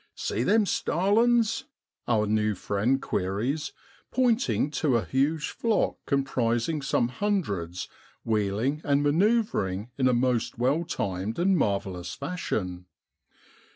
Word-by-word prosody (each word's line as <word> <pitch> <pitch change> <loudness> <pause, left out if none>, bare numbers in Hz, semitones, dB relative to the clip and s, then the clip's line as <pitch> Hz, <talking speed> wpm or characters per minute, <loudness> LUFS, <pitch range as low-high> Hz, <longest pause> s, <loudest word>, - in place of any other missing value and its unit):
' - - -48
See 110 - -1
them 210 - +3
starlings? 225 +5 +2 0.2
' - - -50
our 110 -3 +2
new 105 0 +1
friend 105 +8 0
queries, 115 +13 -2 0.4
pointing 245 - +1
to 145 -5 +1
a 110 - -2
huge 145 - 0
flock 225 -3 0
com 140 -1 +2
prising 120 +4 0
some 125 -3 +1
hundreds 125 - -2 0.4
wheeling 110 +7 0
and 140 0 +2
manoeuvring 145 - +1
in 130 - +4
a 125 - +3
most 120 -1 0
well 135 +8 +1
timed 100 - -3
and 190 +2 +3
mar 100 - +2
vellous 90 -3 -7
fashion. 100 - -3
130 Hz, 130 wpm, -27 LUFS, 105-175 Hz, 0.4 s, in